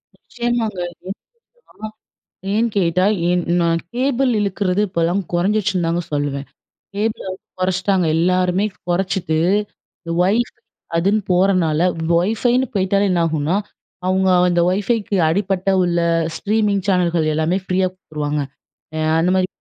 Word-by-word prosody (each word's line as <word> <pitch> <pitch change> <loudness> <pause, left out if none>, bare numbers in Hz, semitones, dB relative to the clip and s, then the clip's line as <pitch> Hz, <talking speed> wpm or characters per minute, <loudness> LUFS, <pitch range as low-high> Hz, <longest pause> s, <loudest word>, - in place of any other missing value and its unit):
நிச்சியமாங்க 235 -4 -3
அது. 175 +1 -16 0.8
அ, - - -2 0.7
ஏன் 230 +2 +2
கேட்டா, 185 0 +2 0.2
ஏன் 180 0 +1 0.2
நா, 170 - +2 0.3
கேபிள் 265 +1 +1
இழுக்குறது, 200 -1 0
இப்பல்லாம் 175 +2 0
குறஞ்சுச்சுன்னு 190 0 +1
தாங்க 170 +1 0
சொல்லுவேன். 145 -1 -2 0.5
கேபிள 215 +2 -1
வந்து 185 - -10 0.2
குறைச்சிட்டாங்க. 185 0 +1
எல்லாருமே 180 +3 +2 0.2
குறைச்சிட்டு 175 -3 0 0.6
இந்த 165 - -6
WIFI 215 +7 +1 0.4
அதுனு 195 +6 +2
போறனால, 180 -4 +2 0.3
WIFIன்னு 225 +8 +2
போய்ட்டாலே 195 +1 +2
என்னாகும்னா. 165 -1 +1 0.5
அவங்க 190 0 +2 0.2
அந்த 175 -1 +2
WIFIக்கு 205 +2 0
அடிபட்ட 190 +2 0
உள்ள 175 -1 +1 0.4
ஸ்ட்ரீமிங் 210 -2 0
சேனல்கள் 175 -4 +2
எல்லாமே 160 +4 +1
ஃப்ரீயா 185 0 +1
குடுத்துருவாங்க. 150 -5 -4 0.6
அ - - -2 0.2
அந்தமாரி 185 +2 +2
185 Hz, 115 wpm, -19 LUFS, 170-205 Hz, 0.8 s, ஏன்